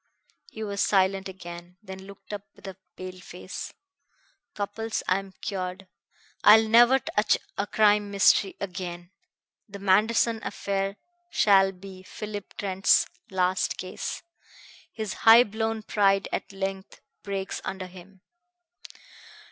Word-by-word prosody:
He 220 - -7
was 200 -1 -2
silent 195 -1 +2
again, 175 -1 -10
then 190 -1 -9
looked 200 +1 -12
up 205 - -4
with - - -16
a 190 - -7 0.2
pale 185 0 -8
face. 180 +1 -8 0.8
"Cupples, 220 +2 -3
I 185 +1 +3
am 195 -1 -11
cured. 190 -1 -4 0.6
I 210 +1 +10
will 220 0 -1
never 240 +3 +7
touch 215 -4 +1 0.2
a 200 - -2
crime 210 -1 +3
mystery 200 0 +3
again. 175 -2 -6 0.6
The 200 - -8
Manderson 215 +4 +2
affair 195 0 -3 0.3
shall 195 - +4
be 190 0 -12
Philip 205 +1 -8
Trent's 195 -1 +3 0.2
last 185 0 0
case. 185 0 -5 0.7
His 215 -4 -4 0.2
high 230 +2 +10
blown 220 0 -3
pride 195 -2 +2
at - - -3
length 195 0 -5 0.2
breaks 195 -1 -4
under 190 -1 -5
him." 185 +1 -14
195 Hz, 125 wpm, -26 LUFS, 190-210 Hz, 0.8 s, I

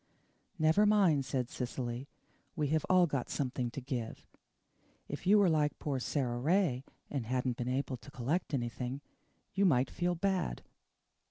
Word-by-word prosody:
"Never 160 +6 +4
mind," 185 -10 +4
said 130 -2 -2
Cecily, 125 +1 -4 0.5
"we 150 -4 0
have 155 0 +1
all 185 -1 +6
got 140 -6 -2
something 125 -3 -1
to 120 - -6
give. 125 -4 -5 0.8
If 145 +5 -6
you 205 +2 +7
were 200 -2 +5
like 150 -3 +2
poor 140 -3 -2
Sara 125 -2 -1
Ray, 150 -3 +2 0.3
and 135 -6 -2
hadn't 125 -1 0
been 120 0 -2
able 130 0 -1
to 130 - -14
collect 150 +4 -1
anything, 125 +2 -3 0.5
you 195 - +2
might 130 -8 +3
feel 175 0 0
bad." 185 - -1
140 Hz, 155 wpm, -33 LUFS, 125-170 Hz, 0.8 s, you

